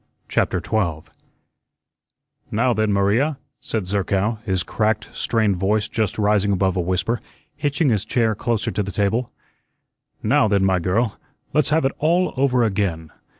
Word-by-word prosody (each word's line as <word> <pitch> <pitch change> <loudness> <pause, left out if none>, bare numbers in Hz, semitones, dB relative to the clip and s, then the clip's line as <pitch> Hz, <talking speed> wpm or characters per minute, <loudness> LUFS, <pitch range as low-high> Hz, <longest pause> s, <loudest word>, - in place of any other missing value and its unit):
CHAPTER - - +1
12 85 -8 -2 1.4
"Now, 120 +3 +2
then, 110 -1 +1
Maria," 110 +10 +2 0.2
said 110 -4 -3
Zerkow, 100 +3 0
his 95 -4 0
cracked, 110 +1 -1
strained 110 -5 +1
voice 105 +3 +1
just 110 -3 -2
rising 105 -1 +2
above 95 -1 +1
a 90 - +1
whisper, 95 +6 -1 0.3
hitching 145 0 0
his 105 -4 +1
chair 110 0 +1
closer 115 +1 -1
to 105 - -1
the 100 0 -4
table, 110 +5 0 0.9
"now, 110 - +3
then, 100 -2 +2
my 95 -1 +2
girl, 100 +6 0 0.3
let's 150 -2 +2
have 155 -1 +2
it 135 - +2
all 175 +4 +2
over 130 -2 +2
again. 95 -7 -1
105 Hz, 150 wpm, -22 LUFS, 95-120 Hz, 1.4 s, now